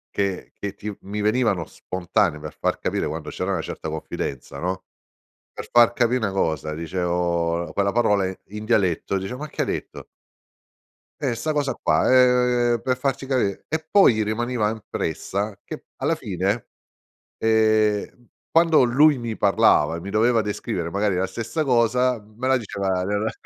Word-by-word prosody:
che 100 Hz, -2 st, -2 dB
che 100 Hz, -1 st, -6 dB
ti 105 Hz, +1 st, -5 dB
v 100 Hz, -, -12 dB
mi 105 Hz, +2 st, -5 dB
venivano 105 Hz, -5 st, +1 dB
spontanee 90 Hz, -2 st, -1 dB
per 75 Hz, 0 st, -8 dB
far -, -, 0 dB
capire -, -, -1 dB
quando -, -, -5 dB
c'era -, -, -3 dB
una -, -, -1 dB
certa 80 Hz, -, -6 dB
confidenza, 70 Hz, -3 st, -5 dB
no, 95 Hz, +3 st, -3 dB, 0.7 s
per -, -, -8 dB
far 120 Hz, -1 st, +6 dB
capi' 120 Hz, +1 st, +2 dB
'na 105 Hz, -4 st, -1 dB
cosa 80 Hz, -5 st, -1 dB
dicevo 85 Hz, 0 st, -1 dB
l -, -, -9 dB
quella 100 Hz, 0 st, 0 dB
parola 105 Hz, -5 st, +2 dB
i 95 Hz, -, -5 dB, 0.2 s
in 105 Hz, -, -6 dB
dialetto 100 Hz, -4 st, +1 dB
dice: 95 Hz, +6 st, -5 dB
"Ma 150 Hz, +3 st, -6 dB
che 150 Hz, -, -4 dB
hai -, -, -1 dB
detto?" -, -, -5 dB, 1.2 s
Eh, 130 Hz, -4 st, 0 dB
'sta 155 Hz, +7 st, -2 dB
cosa 145 Hz, -2 st, 0 dB
qua, 80 Hz, -, +2 dB, 0.7 s
ehm, 120 Hz, -, -1 dB
per 130 Hz, -1 st, 0 dB
farci 135 Hz, +1 st, -2 dB
capi 130 Hz, -2 st, +2 dB, 0.2 s
e 160 Hz, 0 st, -3 dB
poi 195 Hz, -, +6 dB
gli 110 Hz, -, +1 dB
rimaneva 110 Hz, 0 st, -1 dB
impressa 100 Hz, 0 st, -4 dB
che -, -, -6 dB
p -, -, -37 dB
alla -, -, 0 dB
fine, 100 Hz, +4 st, -2 dB, 0.7 s
ehm, 110 Hz, +1 st, +1 dB, 0.2 s
quando 165 Hz, -2 st, +5 dB
lui 145 Hz, +5 st, +5 dB
mi 115 Hz, -2 st, -4 dB
parlava 85 Hz, -5 st, +3 dB
e -, -, -6 dB
mi 95 Hz, +4 st, -7 dB
doveva 115 Hz, +2 st, +3 dB
descrivere 90 Hz, -5 st, -3 dB
magari 100 Hz, +1 st, 0 dB
la 95 Hz, +1 st, +1 dB
stessa 115 Hz, -, -3 dB
cosa, 125 Hz, -1 st, +2 dB
me 110 Hz, +5 st, -5 dB
la 130 Hz, -, +4 dB
diceva 100 Hz, -5 st, -2 dB
nella 105 Hz, +3 st, -1 dB
105 Hz, 170 wpm, -23 LUFS, 95-120 Hz, 1.2 s, far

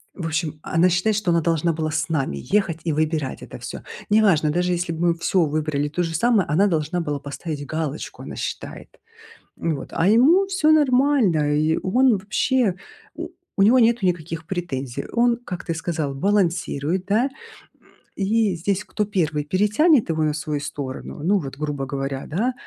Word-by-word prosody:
В 175 Hz, -, -5 dB
общем, 160 Hz, -1 st, -2 dB
она 170 Hz, +2 st, +3 dB
считает, 180 Hz, +5 st, +1 dB
что 200 Hz, -4 st, 0 dB
она 170 Hz, 0 st, +3 dB
должна 165 Hz, 0 st, +1 dB
была 155 Hz, 0 st, -2 dB
с 155 Hz, +2 st, -1 dB
нами 135 Hz, -, -1 dB, 0.2 s
ехать 190 Hz, -6 st, +2 dB
и 160 Hz, -, 0 dB
выбирать 155 Hz, -2 st, -1 dB
это -, -, -9 dB
всё. -, -, -7 dB, 0.3 s
Неважно, 195 Hz, -8 st, +4 dB
даже 180 Hz, +3 st, 0 dB
если 175 Hz, 0 st, -2 dB
бы -, -, -8 dB
мы 170 Hz, -, +4 dB
всё 170 Hz, 0 st, +1 dB
выбрали 150 Hz, -1 st, -1 dB
то 175 Hz, +4 st, -1 dB
же 165 Hz, -1 st, -3 dB
самое, 220 Hz, 0 st, +3 dB
она 185 Hz, +8 st, +3 dB
должна 165 Hz, 0 st, -1 dB
была 150 Hz, -3 st, -3 dB
поставить 145 Hz, +1 st, -6 dB
галочку, 155 Hz, 0 st, -4 dB
она -, -, -7 dB
считает, -, -, -6 dB, 0.7 s
м, 165 Hz, -2 st, 0 dB
вот. -, -, -8 dB
А 165 Hz, -, +1 dB
ему 285 Hz, -, +5 dB
всё 370 Hz, -5 st, +2 dB
нормально, 255 Hz, -, +3 dB
и 155 Hz, +2 st, +2 dB
он 250 Hz, +7 st, +4 dB
вообще 210 Hz, +2 st, +1 dB, 0.4 s
у -, -, -6 dB, 0.3 s
у 195 Hz, -, +3 dB
него 230 Hz, +6 st, +6 dB
нету 230 Hz, -3 st, +3 dB
никаких 165 Hz, -2 st, -2 dB
претензий. 140 Hz, -8 st, -4 dB
Он, 235 Hz, 0 st, +3 dB
как 180 Hz, -1 st, -6 dB
ты 165 Hz, -, -1 dB
сказал, 160 Hz, -4 st, -3 dB
балансирует, 180 Hz, -2 st, 0 dB
да. 225 Hz, +7 st, +2 dB, 0.9 s
И 210 Hz, +1 st, +1 dB
здесь 195 Hz, +4 st, -1 dB
кто 210 Hz, 0 st, -2 dB
1 160 Hz, -7 st, -1 dB
перетянет 210 Hz, -, +3 dB
его 160 Hz, -1 st, 0 dB
на 150 Hz, -1 st, +1 dB
свою 150 Hz, -1 st, -3 dB
сторону, 140 Hz, 0 st, -6 dB
ну, 200 Hz, +3 st, +3 dB
вот, 135 Hz, -4 st, -7 dB
грубо 145 Hz, -2 st, -3 dB
говоря, 135 Hz, 0 st, -4 dB
да, 225 Hz, +11 st, -1 dB
170 Hz, 175 wpm, -22 LUFS, 155-205 Hz, 0.9 s, него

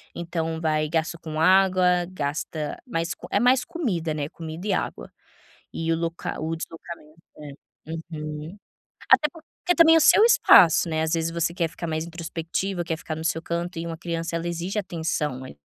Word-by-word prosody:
então, 165 Hz, -1 st, -3 dB
vai 155 Hz, -1 st, +1 dB
gasto 165 Hz, +1 st, -2 dB
com 155 Hz, -1 st, -5 dB
água, 185 Hz, 0 st, +4 dB
gasta 150 Hz, -2 st, -4 dB
mais 165 Hz, -6 st, -2 dB
co -, -, -11 dB
é -, -, +2 dB
mais 250 Hz, +1 st, +3 dB
comida, 180 Hz, -, -2 dB
né, 150 Hz, -1 st, -3 dB
comida 165 Hz, +3 st, -8 dB
e -, -, +1 dB
água, -, -, -3 dB, 0.6 s
e 165 Hz, 0 st, -2 dB
o -, -, +1 dB
local 165 Hz, -1 st, -4 dB
o 165 Hz, -, -1 dB
deslocamento 165 Hz, -1 st, -9 dB, 0.2 s
É, 150 Hz, +2 st, -12 dB, 0.2 s
uhum. 155 Hz, +2 st, -6 dB, 0.6 s
Até 300 Hz, -, +6 dB
porque 340 Hz, +2 st, -3 dB
também 325 Hz, -1 st, +7 dB
é 325 Hz, -, +7 dB
o -, -, +2 dB
seu 415 Hz, -, +7 dB
espaço, 170 Hz, -, +6 dB
né, 160 Hz, -, 0 dB
às 160 Hz, 0 st, -1 dB
vezes, 165 Hz, 0 st, 0 dB
você 170 Hz, 0 st, -1 dB
quer 170 Hz, -3 st, 0 dB
ficar 170 Hz, -, -6 dB
mais 160 Hz, 0 st, -2 dB
introspectiva, 170 Hz, +2 st, -4 dB
quer 160 Hz, -1 st, -3 dB
ficar 155 Hz, -, -5 dB
no 160 Hz, -, -6 dB
seu 165 Hz, 0 st, 0 dB
canto 170 Hz, +1 st, -3 dB
e 165 Hz, -, -4 dB
uma 165 Hz, -1 st, -5 dB
criança 170 Hz, 0 st, -3 dB
ela 165 Hz, +1 st, -3 dB
exige 175 Hz, +4 st, -3 dB
atenção 160 Hz, -8 st, -2 dB
ali, 70 Hz, -, -11 dB
165 Hz, 185 wpm, -25 LUFS, 160-175 Hz, 0.6 s, também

